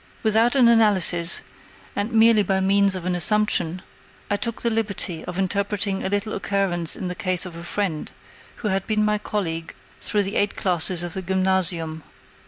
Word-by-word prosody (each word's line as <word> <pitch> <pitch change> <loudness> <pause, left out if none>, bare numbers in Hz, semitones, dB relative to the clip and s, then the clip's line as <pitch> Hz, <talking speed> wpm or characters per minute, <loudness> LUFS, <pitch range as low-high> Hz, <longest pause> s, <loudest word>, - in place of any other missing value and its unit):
Without 225 +3 +3
an 255 -3 +5
analysis, 195 -7 +3 0.5
and 205 +3 -2
merely 225 -1 +5
by 195 -1 0
means 195 0 +3
of 180 -2 -6
an 180 - 0
assumption, 180 -2 +1 0.5
I - - +3
took 230 +2 -3
the 235 - +1
liberty 200 -7 -1
of 180 - -6
interpreting 200 +1 -1
a - - -1
little 205 +2 -2
occurrence 190 -5 0
in 185 - -5
the 180 - -3
case 185 0 -2
of 175 -2 -9
a 170 - -8
friend, 175 -3 -3 0.5
who - - +2
had 195 -1 -1
been 215 -1 +1
my 210 0 +1
colleague 165 -6 -4 0.2
through 210 -2 +1
the 195 +2 -1
eight 205 0 0
classes 180 -1 +1
of 175 -2 -5
the 190 - -4
Gymnasium. 185 -3 0
195 Hz, 180 wpm, -23 LUFS, 180-210 Hz, 0.5 s, an